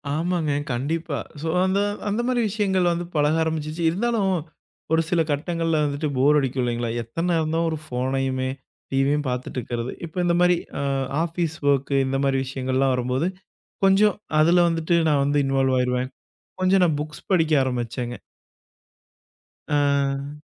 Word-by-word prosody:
ஆமாங்க. 165 -1 0 0.2
கண்டிப்பா. 150 +4 -2 0.2
சோ. 165 - -3 0.2
அந்த 190 +1 +1 0.3
அந்த 210 +4 0
மாரி 250 -1 +1
விஷயங்கள் 190 -4 +1
வந்து 170 +1 -2
பழக 150 +1 +3
ஆரம்பிச்சிச்சு. 160 0 -3
இருந்தாலும் 215 +3 0 0.7
ஒரு 160 - +4
சில 175 -3 +2
கட்டங்கள்ல 165 +2 0
வந்துட்டு 145 +2 -2
போர் 145 +3 +5
அடிக்கும் 130 -1 -1
இல்லைங்களா. 120 -1 -1
எத்தன் 165 +10 -3
நேரம்தா 160 -1 +1
ஒரு 160 - -2
ஃபோனையுமே 130 -1 -1 0.4
டிவியும் 140 +2 +2
பாத்துட்டு 125 +1 -4
இருக்கிறது. 120 +1 -4
இப்ப 165 - -13
இந்த 170 0 +2
மாரி. 180 0 +4 0.2
அ - - -1 0.4
ஆஃபீஸ் 170 -1 -2 0.2
ஓர்க்கு 140 0 0
இந்த 135 +1 -1
மாரி 135 -1 +2
விஷயங்கள்லாம் 130 0 0
வரும்போது 125 +5 0 0.6
கொஞ்ச 195 +1 +5 0.4
அதுல 175 +3 +5
வந்துட்டு 165 0 0
நான் 145 -2 +3
வந்து 145 +1 +1
இன்வால் 135 -1 +1
ஆயஇருவேன். 125 0 0 0.5
கொஞ்ச 185 +1 +3
நா 180 - +5
புக்ஸ் 150 +1 -7
படிக்க 165 -4 +3
ஆரம்பிச்சேன்ங்க. 120 -1 -3 1.5
ஆ. 140 0 0
150 Hz, 140 wpm, -23 LUFS, 130-170 Hz, 1.5 s, போர்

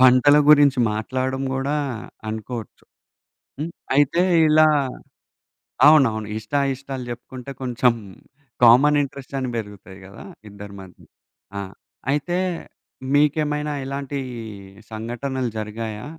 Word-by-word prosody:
వంటల 130 +3 +6
గురించి 145 -3 +6
మాట్లాడడం 130 +5 -2
గుడా 135 +3 -1 0.5
అనుకోవచ్చు. 110 +1 -6 0.7
హ్మ్. 155 +3 -3 0.2
అయితే 145 +5 +3 0.3
ఇలా 155 +1 +6 1.2
అవునవును 120 -9 +4
ఇష్టా 110 +6 -1
ఇష్టాలు 135 -1 -7
చెప్పుకుంటే 125 +2 -8
కొంచెం 125 -1 +2 0.7
కామన్ 140 +5 +6
ఇంట్రెస్టని 135 -1 -4
పెరుగుతాయి 100 -3 -8
గదా 95 0 -12 0.3
ఇద్దరి 100 0 -10
మధ్య. 95 -2 -15 0.6
ఆ! - - -2 0.5
అయితే 150 +5 -1 0.8
మీకేమైనా 150 0 +1
ఇలాంటి 140 +1 -4 0.7
సంఘటనలు 120 +3 -3
జరిగాయా? 110 0 -5
130 Hz, 95 wpm, -22 LUFS, 110-145 Hz, 1.2 s, వంటల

